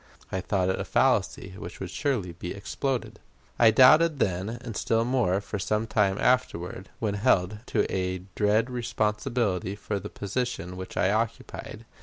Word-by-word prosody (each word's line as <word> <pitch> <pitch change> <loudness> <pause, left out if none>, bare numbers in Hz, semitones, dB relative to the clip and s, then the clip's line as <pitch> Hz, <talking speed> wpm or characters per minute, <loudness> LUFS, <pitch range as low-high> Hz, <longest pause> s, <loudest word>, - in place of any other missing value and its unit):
I 95 - -1
thought 95 -1 0
it 95 - 0
a - - -1
fallacy 95 -1 +1
which - - -8
would - - -5
surely 115 -11 -1
be 90 +2 -6
exploded. 120 +6 -3 0.4
I 115 - +8
doubted 150 +7 +6
then, 95 -4 0
and 120 -1 -7
still 115 +2 +1
more 120 -7 +2
for 100 0 -5
some 105 +3 0
time 100 -3 +1
afterward, 95 -7 0
when 105 -3 -1
held 100 0 +2
to 105 - +1
a 90 -1 -2
dread 110 +4 +2
responsibility 110 -4 -1
for 100 0 -3
the - - -7
position 100 -4 -3
which 95 0 -8
I 95 - +3
occupied. 110 +1 -3
105 Hz, 160 wpm, -27 LUFS, 95-120 Hz, 0.4 s, I